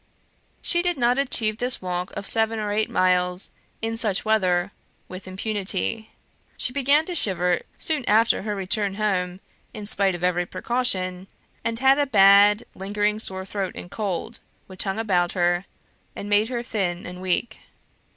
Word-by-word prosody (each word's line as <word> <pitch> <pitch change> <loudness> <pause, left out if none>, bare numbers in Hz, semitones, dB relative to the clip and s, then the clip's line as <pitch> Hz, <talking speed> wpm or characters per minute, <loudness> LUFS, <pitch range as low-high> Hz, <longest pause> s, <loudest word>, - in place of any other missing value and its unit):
She 345 - +2
did 355 -2 0
not 245 +1 +2
achieve 225 -5 0
this 250 +1 +3
walk 180 0 -4
of 200 - -5
seven 225 +1 +2
or 210 -1 -2
eight 215 +1 0
miles, 180 0 +1 0.3
in 225 0 -1
such 215 -4 +1
weather, 190 -4 +2 0.4
with 185 +1 -9
impunity. 205 +2 -2 0.5
She 250 - -1
began 285 +3 +3
to 360 - -4
shiver 180 - 0 0.2
soon 310 -4 +1
after 225 +2 +4
her 210 0 -3
return 195 +1 -1
home, 190 -3 -1 0.3
in 210 -1 -6
spite 200 -2 +2
of 175 - -7
every 180 -1 +1
precaution, 185 -4 -2 0.4
and 230 0 -2
had 270 +3 +4
a 290 - +2
bad 205 -1 +6
lingering 205 +2 -1
sore 190 -3 -2
throat 195 -1 -4
and 175 - -9
cold, 210 +2 -4 0.3
which 185 +1 -6
hung 195 +1 -2
about 180 -6 +1
her; 175 0 +1 0.5
and 200 - -6
made 205 +2 +2
her 240 -2 -3
thin 185 -7 -2
and 180 +1 -8
weak. 185 +5 -1
205 Hz, 160 wpm, -24 LUFS, 185-225 Hz, 0.5 s, bad